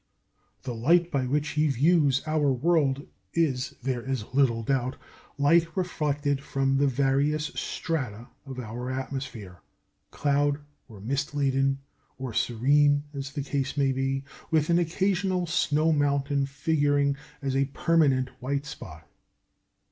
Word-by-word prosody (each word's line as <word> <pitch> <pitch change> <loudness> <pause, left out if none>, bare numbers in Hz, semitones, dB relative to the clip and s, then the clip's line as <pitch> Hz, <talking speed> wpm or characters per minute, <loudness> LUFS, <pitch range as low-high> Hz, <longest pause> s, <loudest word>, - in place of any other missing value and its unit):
The 125 - -4
light 170 +9 +3
by 135 -3 0
which 150 +3 0
he 155 +1 +1
views 145 0 +3
our 155 -2 +2
world 140 0 +1 0.3
is, 140 -7 0
there 130 -2 -1
is 130 -3 -4
little 125 -4 +2
doubt, 130 +1 0 0.4
light 165 +5 +3
reflected 145 -6 -1
from 135 -1 0
the 140 +1 +3
various 140 +3 +1
strata 125 -8 -3 0.2
of 130 -1 -7
our 120 +1 -5
atmosphere, 130 -8 -5 0.5
cloud 145 0 +1 0.3
or 105 -6 -13
mist 140 +6 -2
laden 135 -1 +2 0.4
or 130 -3 -5
serene, 145 +6 +3
as 140 -1 -5
the 145 -1 -3
case 135 0 -2
may 135 -1 +3
be, 135 +1 -1 0.3
with 160 0 +2
an 170 - +4
occasional 185 +1 0
snow 155 -1 +2
mountain 140 -1 +1
figuring 145 0 +1 0.2
as 135 -1 -2
a 135 0 +3
permanent 135 -3 +2
white 140 +3 -2
spot. 80 - -10
140 Hz, 135 wpm, -27 LUFS, 130-150 Hz, 0.5 s, an